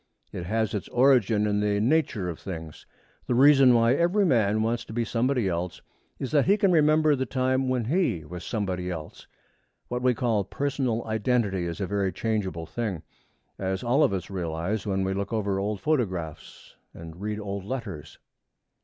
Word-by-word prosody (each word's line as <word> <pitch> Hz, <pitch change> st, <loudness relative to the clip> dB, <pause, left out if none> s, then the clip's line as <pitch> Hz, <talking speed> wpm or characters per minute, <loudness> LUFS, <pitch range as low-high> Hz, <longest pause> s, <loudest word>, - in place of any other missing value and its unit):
It 85 Hz, -, -6 dB
has 110 Hz, +1 st, 0 dB
its 105 Hz, -, -3 dB
origin 120 Hz, -5 st, +3 dB
in 105 Hz, -1 st, +1 dB
the 105 Hz, 0 st, +1 dB
nature 115 Hz, -, +1 dB
of 85 Hz, -3 st, -5 dB
things. 80 Hz, -5 st, -8 dB, 0.4 s
The 125 Hz, -, +1 dB
reason 135 Hz, -1 st, +6 dB
why 115 Hz, +1 st, +4 dB
every 175 Hz, +7 st, +2 dB
man 110 Hz, -, +2 dB
wants 115 Hz, +1 st, -1 dB
to -, -, -9 dB
be 120 Hz, 0 st, 0 dB
somebody 120 Hz, 0 st, 0 dB
else 85 Hz, -2 st, -3 dB, 0.3 s
is 135 Hz, -, -5 dB
that 145 Hz, -3 st, +3 dB
he 200 Hz, +2 st, +5 dB
can 200 Hz, -3 st, +3 dB
remember 155 Hz, -2 st, +4 dB
the 130 Hz, -1 st, -2 dB
time 130 Hz, +2 st, 0 dB
when 125 Hz, -3 st, 0 dB
he 120 Hz, -, 0 dB
was 90 Hz, +3 st, -8 dB
somebody 95 Hz, -5 st, -3 dB
else. 80 Hz, -4 st, -7 dB, 0.6 s
What 125 Hz, 0 st, -2 dB
we 125 Hz, -1 st, +2 dB
call 110 Hz, -4 st, +1 dB
personal 130 Hz, +1 st, -2 dB
identity 110 Hz, -4 st, 0 dB
is 85 Hz, +2 st, -5 dB
a 100 Hz, -, -1 dB
very 100 Hz, 0 st, -1 dB
changeable 95 Hz, -8 st, -2 dB
thing, 100 Hz, -5 st, -4 dB, 0.6 s
as 95 Hz, +1 st, -2 dB
all 125 Hz, +5 st, +2 dB
of -, -, +3 dB
us 95 Hz, 0 st, -4 dB
realize 90 Hz, +3 st, -3 dB
when 95 Hz, -1 st, 0 dB
we 95 Hz, 0 st, -1 dB
look 100 Hz, +1 st, -3 dB
over 100 Hz, -3 st, -1 dB
old 105 Hz, +1 st, -2 dB
photographs 95 Hz, -, -3 dB, 0.2 s
and 85 Hz, +2 st, -10 dB
read 105 Hz, 0 st, -3 dB
old 100 Hz, -2 st, -5 dB
letters. 100 Hz, -, -6 dB
110 Hz, 180 wpm, -26 LUFS, 95-125 Hz, 0.6 s, reason